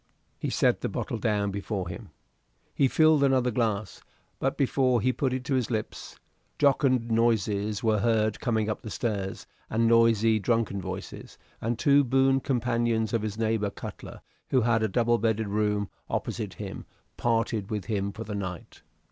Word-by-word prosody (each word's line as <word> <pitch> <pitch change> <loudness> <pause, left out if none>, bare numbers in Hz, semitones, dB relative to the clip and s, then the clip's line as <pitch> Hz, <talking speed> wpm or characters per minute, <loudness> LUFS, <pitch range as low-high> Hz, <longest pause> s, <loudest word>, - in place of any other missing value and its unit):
He - - -2
set - - +2
the - - -1
bottle 115 - -3
down 105 -3 0
before 100 -1 -3
him. 85 0 -8 0.6
He 135 - +3
filled 155 +1 +4
another 130 -2 +3
glass; 110 -3 -2 0.4
but - - -1
before 130 -2 +2
he 130 +4 +1
put 135 -1 -1
it 130 0 -2
to 140 - -1
his 125 -3 0
lips 110 -3 -4 0.4
jocund 130 -4 +2
noises 110 -3 +1
were 110 -2 +2
heard 110 0 +1
coming 110 -3 0
up 110 - -3
the 110 - -7
stairs, 100 -3 -3 0.2
and 115 +1 +2
noisy, 115 -1 +4
drunken 110 -2 0
voices, - - -7 0.2
and 115 +1 -1
two 140 +3 +4
boon 135 +1 +3
companions 120 -4 0
of 115 - +1
his 105 -1 -4
neighbor 110 -2 0
Cutler - - -9 0.3
who 130 - +3
had 115 -1 +2
a 110 - +2
double 120 +3 +2
bedded 110 -1 0
room 105 0 0 0.2
opposite - - -3
him - - -7 0.3
parted 115 -3 0
with 105 -3 -3
him 100 -3 -1
for 110 +3 -7
the 105 -1 -6
night. 95 -4 -6
115 Hz, 165 wpm, -27 LUFS, 105-120 Hz, 0.6 s, filled